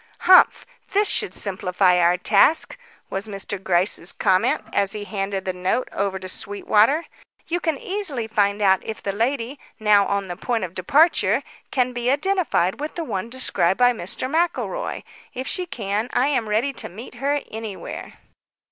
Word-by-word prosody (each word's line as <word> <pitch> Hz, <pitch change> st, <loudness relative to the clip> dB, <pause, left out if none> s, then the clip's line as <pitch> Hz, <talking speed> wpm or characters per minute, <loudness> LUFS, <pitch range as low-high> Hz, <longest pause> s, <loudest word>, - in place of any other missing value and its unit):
"Humph! 370 Hz, -, +6 dB, 0.3 s
This 410 Hz, +1 st, +4 dB
should 415 Hz, -, +2 dB
simplify 180 Hz, -2 st, +1 dB
our 175 Hz, +1 st, +4 dB
task," 210 Hz, -, +3 dB, 0.4 s
was 195 Hz, +3 st, -3 dB
Mr. 200 Hz, -1 st, -5 dB
Gryce's 175 Hz, -1 st, +1 dB
comment, 235 Hz, +11 st, +1 dB
as 195 Hz, -1 st, +1 dB
he 210 Hz, -1 st, -5 dB
handed 195 Hz, -1 st, -3 dB
the 185 Hz, -, -1 dB
note 185 Hz, +7 st, -1 dB
over 195 Hz, -1 st, -2 dB
to 185 Hz, 0 st, -8 dB
Sweetwater. 210 Hz, -, +1 dB, 0.4 s
"You 350 Hz, +1 st, -1 dB
can 320 Hz, -4 st, -1 dB
easily 355 Hz, -, -3 dB
find 205 Hz, -1 st, +1 dB
out 190 Hz, -1 st, +4 dB
if 220 Hz, -, -7 dB
the 200 Hz, -, -1 dB
lady, 245 Hz, +4 st, -1 dB, 0.2 s
now 210 Hz, -2 st, +4 dB
on 200 Hz, -1 st, -1 dB
the 175 Hz, -, -5 dB
point 230 Hz, +4 st, -2 dB
of 180 Hz, -2 st, -5 dB
departure, 290 Hz, -, +3 dB, 0.3 s
can 250 Hz, -2 st, 0 dB
be 240 Hz, 0 st, -1 dB
identified 290 Hz, -, +1 dB
with 300 Hz, +1 st, -5 dB
the 335 Hz, -, -3 dB
one 215 Hz, -6 st, -4 dB
described 235 Hz, -7 st, +1 dB
by 245 Hz, 0 st, +5 dB
Mr. 220 Hz, +4 st, -3 dB
McElroy. 345 Hz, -, -1 dB, 0.3 s
If 260 Hz, +2 st, -4 dB
she 365 Hz, -1 st, -1 dB
can, 215 Hz, -, -3 dB
I 265 Hz, +3 st, +2 dB
am 235 Hz, -7 st, 0 dB
ready 235 Hz, +7 st, +1 dB
to -, -, -5 dB
meet 220 Hz, +7 st, -10 dB
her 285 Hz, +1 st, +1 dB
anywhere." 220 Hz, -3 st, -7 dB
220 Hz, 165 wpm, -22 LUFS, 195-275 Hz, 0.4 s, Humph